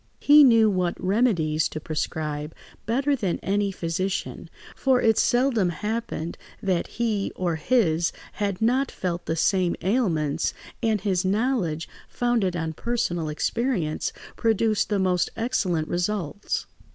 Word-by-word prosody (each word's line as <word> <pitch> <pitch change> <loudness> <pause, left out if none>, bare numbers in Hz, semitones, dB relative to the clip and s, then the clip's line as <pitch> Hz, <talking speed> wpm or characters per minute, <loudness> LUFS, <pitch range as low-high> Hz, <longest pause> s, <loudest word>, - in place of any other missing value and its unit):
He 295 +1 +7
knew 230 -4 +6
what 185 -4 0
remedies 185 -7 +1
to 155 - -5
prescribe 155 -1 -3 0.3
better 270 +5 +2
than 200 -9 -1
any 200 +1 +1
physician, 185 +2 -3 0.3
for 265 -2 +2
it 225 -2 +4
seldom 240 -6 +2
happened 210 -3 -4 0.2
that 185 -3 0
he 220 -4 -1
or 175 -3 -1
his 170 -4 +2 0.2
had 200 0 -2
not 255 +4 +2
felt 175 -2 -4
the 160 - 0
same 180 +1 +2
ailments, 175 - 0 0.3
and 220 -3 +1
his 190 -3 0
knowledge, 190 - 0 0.2
founded 235 -7 0
on 160 -2 -2
personal 175 -7 -2
experience, 180 - -1 0.2
produced 225 -1 +1
the 205 - +1
most 185 -2 +1
excellent 185 -9 0
results. 180 +1 -2
195 Hz, 125 wpm, -25 LUFS, 170-230 Hz, 0.3 s, He